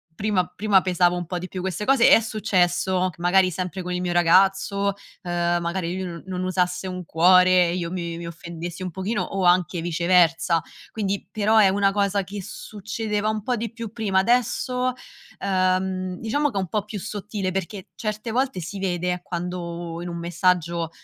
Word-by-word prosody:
prima 200 -3 +1
prima 205 -1 +2
pesavo 180 -1 +2
un 175 - -4
po' 180 +1 -4
di 185 - -6
più 185 -1 -6
queste 190 +2 -3
cose 265 -3 +5
è - - +8
successo 185 -4 +1
che 170 - -15
magari 185 +1 +4
sempre 185 +1 -4
con 180 0 -4
il 180 - -1
mio 175 -1 -1
ragazzo, 195 +3 +3 0.3
ehm, 175 0 0
magari 170 +1 -2
lui 190 - -3
non 170 -1 -7
non 185 -1 -3
usasse 180 0 0
un 180 -1 -5
cuore, 180 +1 +5
e - - -1
io 170 -2 -3
mi 170 -2 -4
mi 170 - -6
offendessi 170 +1 -7
un 180 - -4
pochino 190 +2 -2
o 195 0 -3
anche 175 -1 +3
viceversa, 170 -1 +3 0.3
quindi 200 -2 -3
però 215 +1 +2
è 200 -3 +7
una 195 0 +2
cosa 200 -1 +1
che 195 +1 -7
succedeva 210 0 -3
un 215 -1 -2
po' 245 +4 -1
di 230 -1 -4
più 230 -3 -7
prima, 205 -5 0
adesso, 250 +3 +1 0.5
ehm, 185 -1 0
diciamo 285 +6 0
che 200 - -5
è - - 0
un 185 - -3
po' 210 -2 -1
più 210 -1 -6
sottile 205 -1 -4
perché 190 +1 -5
certe 215 +1 -4
volte 260 -3 0
si 180 +4 -6
vede 180 -2 -1
quando 170 -1 -5
in 175 - -5
un 170 0 -5
messaggio 170 -1 0
185 Hz, 190 wpm, -24 LUFS, 175-205 Hz, 0.5 s, è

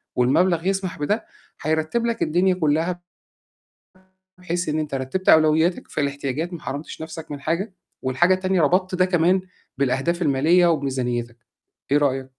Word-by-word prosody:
والمبلغ 165 +8 +2
يسمح 190 -4 -2
بده 210 +10 -1 0.4
هيرتّب 160 +9 0
لك 235 -1 -2
الدنيا 180 +4 +2
كُلّها 165 +2 0 1.4
بحيث 175 -1 -3
إن 155 +1 0
أنت 150 -3 -3
رتّبت 135 +9 -2
أولوياتك 160 +2 +4
في - - -3
الاحتياجات، 140 +4 -3
ما 170 - -6
حرمتش 145 +3 -6
نَفْسك 160 -1 -8
من 145 - -6
حاجة 175 +7 -2 0.3
والحاجة 135 +8 +2
التانية 185 -1 +1
ربطت 185 +4 +2
ده 185 0 +3
كمان 180 +1 +2 0.4
بالأهداف 140 +6 0
الماليّة 165 +5 +3
وبميزانيتك، 125 -6 -1 0.5
إيه 145 - +5
رأيك؟ 135 -2 0
160 Hz, 140 wpm, -22 LUFS, 140-180 Hz, 1.4 s, إيه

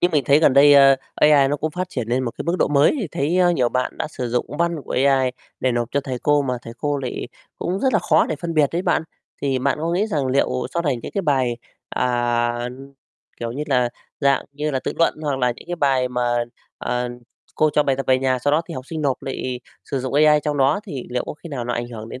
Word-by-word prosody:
Nhưng 175 - +3
mình 145 -5 +1
thấy 140 +3 +5
gần 145 - +5
đây, 145 +1 +7
ơ, 135 -1 +7 0.2
AI 145 -3 +5
nó 145 - 0
cũng 155 +2 -2
phát 180 +2 -3
triển 120 -3 -4
nên 125 +2 +1
một 120 - -2
cái - - -2
mức 170 +2 0
độ - - +2
mới, 145 - +4
thì 205 - -2
thấy, 160 +7 0
a, 180 -1 +5
nhiều 125 -8 +2
bạn 125 +1 -2
đã - - -1
sử 125 -5 -5
dụng 125 +1 -1
văn 170 -1 +1
của - - -6
AI 135 -2 +3 0.3
để 130 - +1
nộp 120 -1 -1
cho 140 - +1
thầy 130 -3 -5
cô, 145 +1 +2
mà 125 -2 -1
thầy 115 - -8
cô 145 -1 -1
lại 125 -2 -4 0.3
cũng 190 +3 -2
rất 260 -2 +2
là 215 - +4
khó - - +3
để 155 - -3
phân 170 0 -5
biệt 150 -3 +4
đấy 175 +2 -1
bạn. 170 -3 +1 0.4
Thì 135 -2 +1
mạn 140 +2 0
có 165 +1 -1
nghĩ 200 +5 +1
rằng 150 -10 -1
liệu 130 -1 0
sau 170 - 0
này 140 -6 0
những - - -7
cái 200 - 0
bài, 130 -6 +1 0.3
à, 120 -1 0 0.7
kiểu 115 0 -3
như 145 +4 -4
là, 125 -4 +2 0.3
dạng 140 -1 +2
như 150 +1 -2
là, 130 -2 -1
tự - - -1
luận 165 - +3
hoặc 140 -3 -1
là 125 -1 +2
những - - -14
cái 175 - -3
bài 135 -4 +2
mà, 120 -1 0 0.3
ờ, 125 0 -2 0.5
cô 155 0 +3
cho 150 - +3
bài 135 -2 +1
tập 135 - -4
về 130 0 +4
nhà, 130 -1 +1
sau 145 +4 0
đó 160 +2 +3
thì - - -6
học 130 +1 -7
sinh 160 -2 -5
nộp 135 -2 -1
lại 130 -2 -4 0.2
sử 135 - -3
dụng 130 +1 -4
AI 150 0 +5
trong 150 -1 -1
đó, 140 +7 +3
thì 140 - -6
liệu 125 0 -1
có - - -6
khi 170 - -11
nào 130 -5 -4
nó 120 0 -2
ảnh 120 0 -3
hưởng 110 -1 -8
đến 130 - -8
135 Hz, 270 wpm, -21 LUFS, 125-150 Hz, 0.7 s, đây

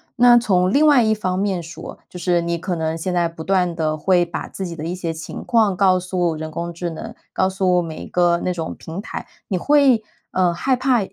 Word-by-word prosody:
那 240 0 +7
从 185 -6 +2
另 290 +6 +4
外 290 -4 +6
一 220 0 +3
方 185 -4 -2
面 195 -3 0
说， 165 +1 -9
就 180 - -9
是 175 0 +1
你 170 0 -1
可 175 +1 -3
能 160 0 -2
现 180 +3 -3
在 175 -1 +2
不 165 -1 -9
断 180 -2 +1
地 155 -2 -1
会 175 +2 +3
把 170 - -5
自 190 - -6
己 170 -2 -6
的 155 -1 -6
一 170 - -2
些 175 -2 -3
情 160 0 -7
况 220 -5 +2
告 185 -1 +3
诉 180 -2 -1
人 155 0 -6
工 170 +2 -4
智 170 +1 -4
能， 225 +8 -7 0.2
告 190 - +2
诉 185 -2 +2
每 160 -2 -6
一 - - -9
个 175 -1 +2
那 180 - 0
种 165 -2 -5
平 165 +4 -7
台， 225 - -7 0.2
你 190 - -1
会 270 0 +4 0.3
呃， 180 -2 +2
害 260 +10 +1
怕 255 -1 +2
180 Hz, 255 characters per minute, -21 LUFS, 170-200 Hz, 0.3 s, 那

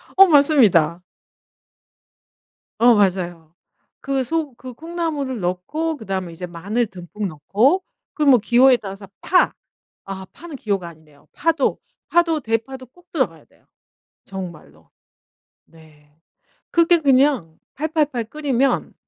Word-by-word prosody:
어 390 0 +8
맞습니다. 230 - +4 1.8
어 240 +1 +6
맞아요. 175 -5 0 0.5
그 275 -1 -1
소 310 0 -2
그 255 0 -10
콩나물을 310 -5 -4
넣고 250 - -2
그다음에 190 -6 -4
이제 180 +2 -6
마늘 200 +8 -2
듬뿍 190 +2 -6
넣고 210 - +1 0.3
그 305 - -1
뭐 270 -4 +6
기호에 245 +4 +4
따라서 195 -2 -9
파 365 0 +3 0.6
아 190 -1 -5
파는 330 -4 -10
기호가 200 -7 -2
아니네요. 155 -3 -17
파도, 325 -4 0 0.3
파도, 335 -2 +2
대파도 255 +2 -3
꼭 355 +7 -25
들어가야 200 - -2
돼요 - - -30 0.6
정말로. 170 - -10 0.8
네. 155 -2 -21 0.6
그렇게 340 0 +4
그냥 265 - +2 0.2
팔팔팔 300 -5 -1
끓이면 275 -3 0
235 Hz, 245 characters per minute, -21 LUFS, 180-295 Hz, 1.8 s, 어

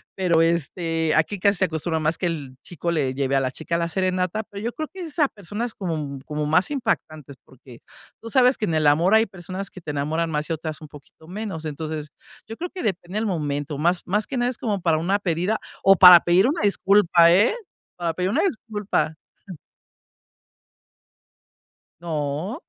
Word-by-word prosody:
Pero, 170 -3 +2
este, 165 -1 0
aquí 180 +5 +1
casi 200 0 +3
se 185 - +2
acostumbra 160 0 -2
más 155 +2 0
que 175 - 0
el 145 -6 -5
chico 170 0 -4
le 140 -5 0
lleve 135 0 0
a - - +4
la 130 -1 -1
chica 170 +4 -3
la 170 0 -1
serenata, 185 +3 -1
pero 200 +1 -9
yo 235 - -2
creo 310 +3 -5
que 380 - -10
es 320 -2 -7
a 295 -3 +4
personas 210 +3 -6
como 155 -7 -4
como 150 -1 -3
más 160 - +2
impactantes, 155 - -3
porque 125 -2 -16 0.4
tú 230 - -8
sabes 255 +2 +4
que 215 - 0
en 160 - -1
el 155 -1 +1
amor 170 +8 +4
hay 220 +1 +5
personas 190 +1 -7
que 185 - -12
te 160 - -9
enamoran 155 +3 -1
más 150 -1 -2
y - - +2
otras 155 0 -6
un 155 - -9
poquito 145 +2 -16
menos. 190 -4 -6
Entonces, 155 0 -5 0.4
yo 225 - -7
creo 355 +1 -4
que 375 - -6
depende 190 -1 -3
del 220 - 0
momento. 145 -5 -3
Más 175 +2 +1
más 210 +4 -1
que 265 - -4
nada 245 +1 +1
es 240 - -11
como 205 -5 -2
para 165 -2 +2
una 190 +5 +1
pedida, 180 +3 -1 0.3
o 195 0 +7
para 180 -2 +10
pedir 180 +7 +3
una 315 +5 -1
disculpa, 190 -4 +4
¿eh? 205 - +4 0.4
Para 170 -2 -2
pedir 180 +2 -1
una 215 - +1
disculpa. 210 - -2 2.9
No. 160 - -3
175 Hz, 195 wpm, -23 LUFS, 155-205 Hz, 2.9 s, para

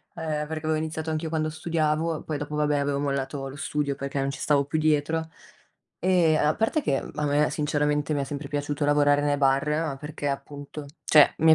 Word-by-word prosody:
ehm, 155 -2 -2
perché 155 0 -5
avevo 155 0 +2
iniziato 160 0 -3
anch'io 155 +1 -2
quando 155 -1 0
studiavo, 160 0 -1
poi 155 -2 -3
dopo 145 +1 -5
va 150 0 +2
beh, 145 -1 +1
avevo 140 0 0
mollato 140 -1 -2
lo 135 - -8
studio 145 -1 -2
perché 140 0 -4
non 135 0 0
ci - - -8
stavo 140 -2 +2
più 155 +2 -1
dietro. 155 +1 +1 0.7
E 170 -3 +3
a 150 0 +3
parte 225 +8 +1
che, 135 - 0
mhmm, - - -8
a 150 -1 -1
me 145 +1 +2
sinceramente, 150 0 0
mi 140 - 0
è - - 0
sempre 140 0 -5
piaciuto 145 0 -1
lavorare 145 0 +4
nei 145 0 +1
bar, 135 +1 +2
ma 150 -2 -1
perché 150 0 -5
appunto 145 +1 -5 0.2
cioè, 150 -2 +6
mi 160 0 +7
150 Hz, 215 wpm, -26 LUFS, 145-155 Hz, 0.7 s, mi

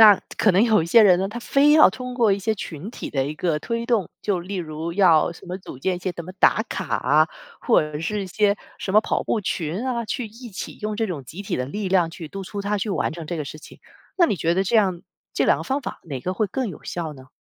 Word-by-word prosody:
那 210 -3 +9 0.2
可 210 - +4
能 190 +4 +4
有 220 -4 +4
一 160 - -2
些 225 +7 +7
人 185 -4 +6
呢， 190 - 0
他 235 +4 -6
非 280 +4 +4
要 305 -8 +8
通 250 +4 -6
过 230 -5 +3
一 195 - 0
些 220 +3 0
群 170 -3 -7
体 235 - -7
的 135 -2 0
一 150 - -4
个 160 -1 0
推 230 +8 -3
动， 230 -6 +1
就 200 -3 0
例 180 +3 -6
如 165 -2 -4
要 170 -4 +4
什 170 - -15
么 180 +1 -5
组 185 - -10
建 180 +8 -1
一 - - -6
些 180 0 -3
什 170 - -6
么 180 - -8
打 220 - +4
卡 190 - -3
啊， 150 +5 +3 0.3
或 - - +4
者 150 -1 -5
是 200 +6 -2
一 - - -5
些 205 +1 +2 0.2
什 190 - -4
么 215 - +8
跑 - - -1
步 225 - 0
群 180 +2 -3
啊， 240 -3 -1
去 240 +3 -3
一 230 +3 -11
起 190 - -7
用 215 0 -2
这 220 0 -1
种 155 -7 -5
集 170 +10 -8
体 200 - -2
的 125 - -2
力 200 +8 -3
量 180 -3 +3
去 165 -3 -8
督 195 +4 -7
促 200 +2 -5
他 205 +1 0
去 205 +2 -2
完 190 - 0
成 165 -1 -7
这 170 - -3
个 155 - -3
事 155 - -8
情。 - - -14 0.4
那 355 - +5
你 205 - 0
觉 170 0 +1
得 190 - +2
这 195 +4 +1
样 190 -5 +2 0.3
这 - - +2
两 - - +4
个 - - -6
方 270 +2 -1
法 - - -6
哪 140 -6 -5
个 185 - -2
会 210 +3 0
更 255 +3 -2
有 175 - -10
效 165 -3 -4
呢？ 130 -2 -14
190 Hz, 305 characters per minute, -23 LUFS, 165-215 Hz, 0.4 s, 那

